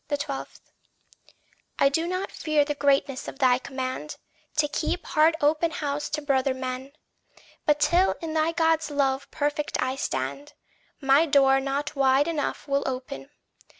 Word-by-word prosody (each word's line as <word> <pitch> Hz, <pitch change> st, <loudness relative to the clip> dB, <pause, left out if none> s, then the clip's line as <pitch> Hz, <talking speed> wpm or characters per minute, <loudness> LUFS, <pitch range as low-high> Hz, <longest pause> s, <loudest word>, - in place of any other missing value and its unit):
12. 285 Hz, -2 st, -4 dB, 1.2 s
I -, -, +5 dB
do 320 Hz, +5 st, 0 dB
not 370 Hz, +2 st, -3 dB
fear 305 Hz, -2 st, +1 dB
the 295 Hz, -, -1 dB
greatness 275 Hz, -2 st, +1 dB
of -, -, -7 dB
thy 255 Hz, -2 st, +4 dB
command 260 Hz, +3 st, -5 dB, 0.4 s
To 300 Hz, 0 st, +2 dB
keep 315 Hz, +4 st, -2 dB
heart 315 Hz, +2 st, +3 dB
open 305 Hz, +3 st, +2 dB
house 295 Hz, -2 st, -3 dB
to 300 Hz, 0 st, -3 dB
brother 270 Hz, -2 st, +1 dB
men; 260 Hz, +1 st, -5 dB, 0.7 s
But 300 Hz, 0 st, +4 dB
till 355 Hz, +5 st, +3 dB
in 325 Hz, -2 st, -5 dB
thy 315 Hz, +1 st, +2 dB
God's 325 Hz, -2 st, +1 dB
love 275 Hz, -1 st, 0 dB
perfect 295 Hz, 0 st, -2 dB
I 255 Hz, +1 st, 0 dB
stand, 140 Hz, -, -4 dB, 0.5 s
My 275 Hz, +4 st, +4 dB
door 270 Hz, -2 st, +5 dB
not 275 Hz, +2 st, -3 dB
wide 270 Hz, +1 st, +3 dB
enough 310 Hz, -2 st, -3 dB
will 280 Hz, 0 st, +1 dB
open. 265 Hz, +1 st, -5 dB
285 Hz, 150 wpm, -26 LUFS, 270-305 Hz, 1.2 s, I